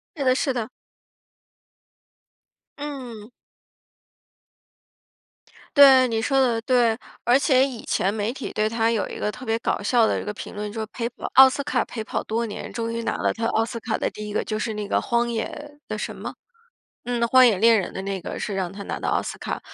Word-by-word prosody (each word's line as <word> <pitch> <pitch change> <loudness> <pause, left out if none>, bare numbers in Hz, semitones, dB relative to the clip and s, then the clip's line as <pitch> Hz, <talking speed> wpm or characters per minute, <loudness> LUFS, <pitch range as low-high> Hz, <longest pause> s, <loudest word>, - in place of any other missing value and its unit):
是 290 - -3
的 255 -1 +3
是 270 -1 0
的。 235 -2 -3 2.1
嗯。 255 -7 -7 2.5
对， 265 -2 +8
你 225 -2 -1
说 270 +4 +1
得 240 -3 +2
对。 240 -3 +3 0.3
而 245 +2 +5
且 270 -2 +4
以 260 -4 -4
前 195 - +1
媒 215 +2 -2
体 270 - -6
对 215 0 0
他 225 0 +1
有 225 -3 0
一 - - -7
个 210 - -1
特 250 +5 -10
别 225 +1 0
搞 - - -1
笑 225 +2 +3
的 - - 0
一 - - -7
个 210 - -3
评 - - -9
论， 210 0 -4
就 225 - -5
是 220 - -4
陪 235 -2 -3
跑 245 - -7
奥 265 0 +10
斯 275 +2 -2
卡 295 - 0
陪 225 - -6
跑 - - -3
多 230 +1 -2
年， 205 - -7
终 230 -1 -3
于 230 0 -3
拿 - - -1
了 - - +1
他 230 0 -3
奥 225 0 +2
斯 230 0 -5
卡 220 -1 -2
的 - - -1
第 210 0 -8
1 210 - -6
个， - - 0
就 215 - -3
是 220 +1 -2
那 210 -1 -4
个 - - +1
荒 235 0 0
野 290 +6 -5
的 215 - -3
什 210 - -5
么？ - - -6 0.7
嗯， 245 -1 -1
《荒 255 +2 +6
野 225 -6 +4
猎 230 +3 +6
人》 190 - -1
的 190 - -5
那 195 -1 -3
个 - - -6
是 205 - -3
让 185 -2 -2
他 200 0 -8
拿 - - -5
到 - - -2
奥 - - +2
斯 - - -6
卡。 - - -4
230 Hz, 235 characters per minute, -24 LUFS, 215-255 Hz, 2.5 s, 奥